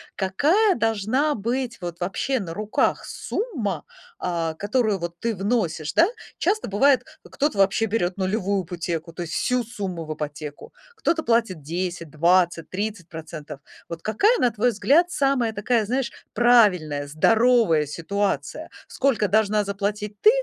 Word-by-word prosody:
какая 310 - +2
должна 225 +7 +1
быть 235 +3 -2
вот 175 -1 -6
вообще 230 +8 -1
на 165 -5 -6
руках 210 +1 0
сумма, 305 - -3 0.3
а, 165 -2 -2
которую 210 +2 0
вот 170 0 -6
ты 230 -2 -1
вносишь? 190 -7 -1
Да, 335 - +5 0.3
часто 415 +5 0
бывает, 260 +7 +3 0.2
э, - - -15
кто-то 290 -6 -1
вообще 195 +3 +3
берёт 195 -4 -1
нулевую 195 0 0
ипотеку, 170 -1 -4
то 175 - -6
есть 170 -1 -5
всю 250 -1 +1
сумму 195 -8 -5
в 155 - -4
ипотеку, 150 0 -7 0.2
кто-то 335 -7 0
платит 225 -8 +1
10, 170 +2 -4
20, 170 +1 +2
30%. 170 -7 -6 0.3
Вот 170 -1 -6
какая, 400 - +2
на 245 - +4
твой 230 +3 +1
взгляд, 310 - +3
самая 270 -5 +1
такая, 215 +1 +1
знаешь, 255 +2 -1 0.2
правильная, 185 -12 +3
здоровая 220 - +3
ситуация? 195 +7 -2 0.2
Сколько 255 -6 +1
должна 210 +1 +2
заплатить 205 +1 -3
ты, 425 - +8
205 Hz, 140 wpm, -24 LUFS, 170-240 Hz, 0.3 s, ты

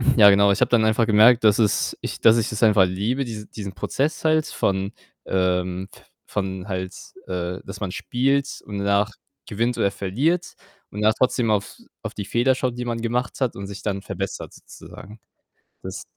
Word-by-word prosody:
ja, 105 -5 +8
genau, 100 0 +5
ich 100 - 0
habe - - +3
dann 115 -2 +3
einfach 110 +1 +2
gemerkt, 110 +3 +6
dass 105 -2 +5
es 105 -3 +1
ich - - -5
dass 115 +1 +6
ich 115 - 0
es 110 - -4
einfach 105 -4 +6
liebe, 105 +9 -1
diese 110 -3 -7
diesen 100 -3 -7
Prozess 145 - -2
halt 155 -1 +3
von 95 0 -1 0.3
ähm, 90 0 0
v - - -16 0.4
von 95 0 -6
halt, 95 -2 -4 0.3
äh, 90 0 -3
dass 100 +1 -8
man 100 -3 -3
spielt 135 +7 -1
und 105 -1 -6
danach 100 +2 +1 0.4
gewinnt 115 +4 -1
oder 100 - +2
verliert 130 - -1 0.4
und 105 - -5
dann 110 +1 +4
trotzdem 125 -2 +1
auf 100 -1 -1 0.3
auf - - -5
die 100 - -5
Fehler 120 +5 +2
schaut, 125 -1 -2
die 125 - -3
man 115 -1 -2
gemacht 120 +2 -2
hat 130 -3 0
und 100 - -6
sich 100 +1 -8
dann 100 -2 -2
verbessert - - -5
sozusagen. 105 +3 -13 0.6
Das 95 +1 -7
105 Hz, 190 wpm, -23 LUFS, 100-120 Hz, 0.6 s, ja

